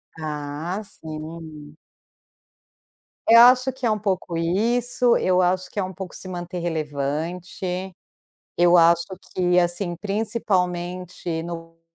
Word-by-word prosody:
Ah, 155 +4 -4
sim. 155 -4 -9 1.5
Eu 230 +1 +10
acho 255 +2 +6
que 260 -1 -5
é 225 - +3
um 215 - 0
pouco 185 -4 -2
isso, 235 +8 +2
eu 185 0 +2
acho 180 0 +1
que - - -18
é 200 - +2
um 185 0 -5
pouco 185 0 -7
se 185 - -7
manter 175 0 -5
relevante. 170 +4 -3 0.6
Eu 175 0 +6
acho 170 0 +5 0.3
que 180 -1 +3
assim 175 +1 0
principalmente 180 -5 -2
no 165 -1 -8
180 Hz, 120 wpm, -23 LUFS, 165-195 Hz, 1.5 s, Eu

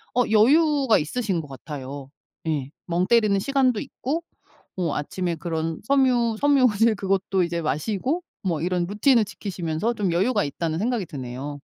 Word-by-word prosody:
어 250 - +4
여유가 270 +3 +4
있으신 190 +2 -2
것 150 - -11
같아요. 135 0 -8 0.4
예. 145 -4 -1 0.2
멍 175 +1 0
때리는 215 -4 +4
시간도 255 0 +2
있고 305 +11 -4 0.5
어 175 -5 -1
아침에 175 +3 -2
그런 160 0 -3
섬유 245 -3 +2
섬유질 250 -6 +4
그것도 195 -1 0
이제 170 -1 -1
마시고 205 - -1 0.2
뭐 170 -5 -1
이런 180 0 0
루틴을 215 +5 +3
지키시면서 185 +1 -3
좀 195 -6 -1
여유가 205 +5 +2
있다는 160 +3 -3
생각이 225 -1 -1
드네요. 140 -1 -6
195 Hz, 325 characters per minute, -24 LUFS, 160-235 Hz, 0.5 s, 어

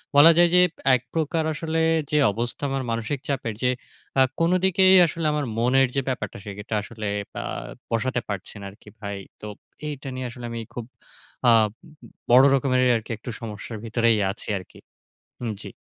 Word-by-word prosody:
বলা 150 +4 +9
যায় 175 0 +6
যে 180 - +7 0.3
এক 125 - -1
প্রকার 160 0 0
আসলে 160 +1 -2 0.3
যে 150 - +3
অবস্থা 120 +6 -4
আমার 135 -1 -2
মানসিক 115 +5 -2
চাপের। 120 -5 -2
যে 125 - +3 0.5
আ - - +7 0.2
কোনো 170 +2 +3
দিকেই 190 0 +5
আসলে 165 0 -3
আমার 150 -1 -1
মনের 130 +3 +3
যে 135 - +2
ব্যাপারটা, 120 -6 -3
সেটা 105 +2 -7
আসলে 110 0 -6 0.3
ব্যা - - -4 0.5
বসাতে 125 +2 0
পারছে 100 0 -5
না - - -7
আরকি 105 - -17
ভাই। 100 -2 -5 0.2
তো - - -8 0.4
এইটা 140 -2 -6
নিয়ে 130 -1 -4
আসলে 120 0 -9
আমি 115 - -4
খুব 120 - -5 0.6
অ্যা 120 - +6 0.2
উ - - -9 0.6
বড় 130 +2 +8
রকমেরই 130 -1 +2
আরকি 110 +1 -4
একটু 110 - -9
সমস্যার 110 0 -6
ভিতরেই 115 0 +2
আছি 100 - -8
আরকি। 95 - -12 0.7
উ - - -2 0.2
জি। - - -8
125 Hz, 175 wpm, -24 LUFS, 115-145 Hz, 0.7 s, বলা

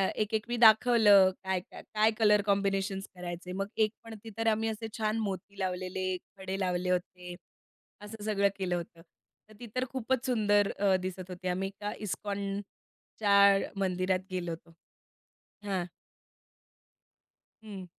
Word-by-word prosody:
एक-एक 215 +1 -1
मी 240 0 -2
दाखवलं 220 -3 +7
काय, 190 -1 0
काय 180 - -12
काय 215 +1 +4
कलर 210 -2 +5
कॉम्बिनेशन्स 195 -1 0
करायचे, 180 0 -6
मग 195 +2 -2
एक 215 -1 +3
पणती 225 -1 -10
तर 225 - -1
आम्ही 225 0 +2
असे 220 +1 -5
छान 215 0 0
मोती 200 -1 -5
लावलेले, 185 0 -2 0.2
खडे 190 0 -4
लावले 180 -1 -1
होते, 180 0 -3 0.7
असं 210 +1 -9
सगळं 200 -2 +2
केलं 185 -2 -1
होतं. 170 -1 -7 0.5
तर - - -15
ती 240 - -8
तर 255 0 +1
खूपच 260 0 0
अ, 250 - -11
सुंदर 205 -5 +2 0.3
दिसत 185 0 -6
होती. 180 0 -6
आम्ही 185 +2 -1
एका 205 +1 -6
इस्कॉनच्या 200 +1 0
मंदिरात 185 0 +1
गेलो 180 -2 -3
होतो. 165 0 -9 0.9
हां. 190 -3 -1 1.8
हं. 200 -4 -8
200 Hz, 135 wpm, -30 LUFS, 185-215 Hz, 1.8 s, दाखवलं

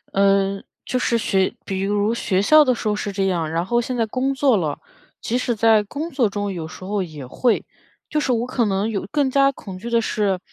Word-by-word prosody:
嗯， 195 0 +2 0.2
就 255 - -1
是 235 -1 +1
学 190 -3 +1
比 190 -1 -3
如 205 +2 +1
学 190 -5 0
校 305 +10 +6
的 255 -3 +2
时 220 - -4
候 210 - +1
是 210 -1 -3
这 195 0 -1
样， 170 -4 -1
然 170 +2 -1
后 240 +3 +1
现 250 +1 -4
在 230 - +2
工 255 +5 -1
作 270 -2 +3
了， 155 -5 -2 0.4
即 245 +2 -1
使 240 -1 -1
在 220 0 +4
工 295 +11 -5
作 250 -6 +2
中 205 -1 -3
有 160 -3 -5
时 160 - -11
候 200 +1 -1
也 150 -5 -8
会。 230 - 0 0.5
就 305 - +1
是 265 - 0
我 235 0 +1
可 250 -2 0
能 200 +1 0
有 200 - -3
更 285 -3 +1
加 275 0 +4
恐 195 -7 -10
惧 235 - -6
的 235 0 +3
是， 205 -4 0
210 Hz, 250 characters per minute, -21 LUFS, 195-250 Hz, 0.5 s, 校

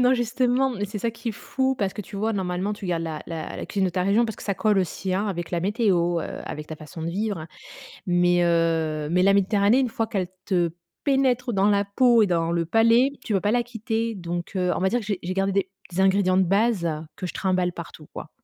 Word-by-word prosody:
non, 250 +1 +5
justement, 250 +2 +1
mais 205 -4 -3
c'est 205 - -7
ça 230 +3 -1
qui 230 +1 -6
est - - -1
fou. 265 +5 -1
Parce 195 -5 -1
que - - -6
tu 205 +1 -9
vois? 220 +3 0
Normalement, 190 0 -2
tu 205 -2 -7
gardes 170 -2 -1
la 160 -2 -5
la 160 -2 -5
la - - -5
cuisine 195 -2 0
de 185 - +1
ta 180 +1 -1
région 200 +5 +3
parce 220 -2 -3
que - - -11
ça 200 - -1
colle 210 0 +2
aussi, 185 +1 -2
hein, 200 +3 0
avec 175 -4 -4
la 175 - -1
météo, 180 -4 +1
heu, - - -6
avec 150 0 -6
ta 160 - -6
façon 155 +1 -9
de 165 - -2
vivre, 195 -3 -2 0.6
mais 175 0 +3
heu, 165 -3 +1
mais 180 +1 +3
la 195 +1 +5
Méditerranée, 200 +3 +3
une 260 -2 +1
fois 225 0 -2
qu'elle 195 -5 -2 0.2
te 175 -4 +1 0.3
pénètre 260 -3 +1
dans 195 +1 +3
la 200 0 +2
peau 235 +2 +4
et - - +2
dans 170 -2 0
le 170 -1 0
palais, 230 - +4
tu 220 - -2
peux 195 - +3
pas 205 - +1
la 245 - +3
quitter, 230 -1 -3
donc 175 0 -5
heu, 180 -1 +1
on - - -2
va 190 - +2
dire 245 +4 0
que - - -9
j'ai 200 -2 -2
j'ai 180 +1 -3
gardé 195 0 0 0.2
des 180 +2 0
ingrédients 190 -1 +3
de 190 - +5
base, 200 0 +2 0.3
que 185 - -5
je - - -7
trimballe 185 -2 0
partout, 160 -3 -10
quoi. - - -8
195 Hz, 250 wpm, -24 LUFS, 175-225 Hz, 0.6 s, non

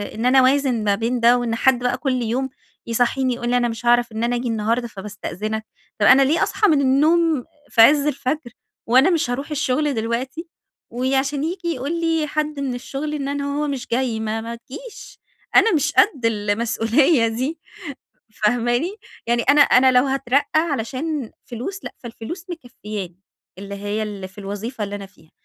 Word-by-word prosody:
إن 225 - -3
أنا 260 +1 +5
أوازن 260 -3 +2
ما 205 -1 +2
بين 230 +4 -1
ده 235 +1 +5
وإن 235 -2 -1
حد 260 +1 +3
بقى 245 0 0
كل 255 -2 -1
يوم 255 +4 -1 0.4
يصحّيني 245 +2 +1
يقول 240 0 -4
لي 245 - +3
أنا 240 -1 +1
مش 230 +1 -6
هاعرف 240 -1 +3
إن 220 +1 -3
أنا 240 +1 +1
آجي 245 +1 -2
النهاردة 230 +2 0
فباستأذنك، 210 +1 -5 0.3
طب 205 - +3
أنا 275 - +7
ليه 285 +5 +3
أصحى 420 - +1
من 295 -3 +3
النوم 305 +2 +3 0.2
في 225 - +4
عزّ 290 +4 +6
الفَجر 275 -2 -2 0.4
وأنا 260 +9 +5
مش 330 -7 +1
هاروح 275 +5 -4
الشغل 295 0 0
دلوقتي، 250 +8 -3 0.4
وعشان 270 +3 0
ييجي 345 +1 -3
يقول 325 +2 -2
لي 325 -2 +1
حد 300 -1 -2
من 270 -2 -2
الشغل 280 +4 -5
إن 280 -2 -3
أنا 285 0 -2 0.2
هو 300 - 0
مش 270 -3 -4
جاي 240 -2 -1
ما 220 0 -2
ما 230 +1 -6
تجيش، 300 - -11 0.4
أنا 450 - +6
مش 300 -4 +1
قد 275 - +3
المسؤولية 230 +5 +2
دي 260 +8 -3 0.7
فاهماني؟ 240 - 0 0.3
يعني 235 0 +1
أنا 285 +2 +4
أنا 260 -1 +5
لو 250 +1 +5
هاترقّى 270 0 +1
علشان 285 -2 -3
فلوس، 275 - -6
لأ - - -7
فالفلوس 240 - -8
مكفّياني 210 - -7 0.4
اللي 200 0 -7
هي 205 +2 -3
اللي 200 -3 -6
في 190 - -21
الوظيفة 205 +3 -5
اللي 200 - -6
أنا 200 -1 -6
فيها، 185 -4 -24
250 Hz, 175 wpm, -21 LUFS, 225-285 Hz, 0.7 s, أنا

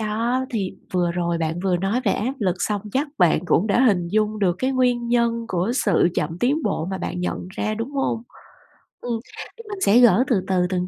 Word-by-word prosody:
Đó, 230 +4 -1
thì 200 -6 -2 0.2
vừa 175 -2 +1
rồi 170 -1 -1
bạn 165 +1 -2
vừa 185 -1 +1
nói 195 +7 0
về 200 - +3
áp 235 +6 -1
lực, 185 -5 +1
xong 205 +2 -1
chắc 285 +3 0
bạn 175 - +4
cũng 180 +3 +2
đã 220 +4 +2
hình 195 -9 +3
dung 215 +2 0
được 185 -4 +1
cái 260 +1 0
nguyên 245 -2 +1
nhân 235 -1 +1
của 185 +5 0
sự 220 - +3
chậm 165 +3 -2
tiến 280 - +1
bộ 195 -5 -1
mà 190 - -3
bạn 180 0 -4
nhận 180 0 -3
ra, 215 +3 -2
đúng 230 +4 -4
hông? 270 -5 -1 0.8
Ừm, 235 -2 -2 0.4
thì 460 - -10
mình 405 -2 -6
sẽ 215 +5 +6
gỡ 240 -1 +6
từ 230 -9 +2
từ 190 - 0
từng 180 -1 -1
210 Hz, 220 wpm, -22 LUFS, 180-240 Hz, 0.8 s, sẽ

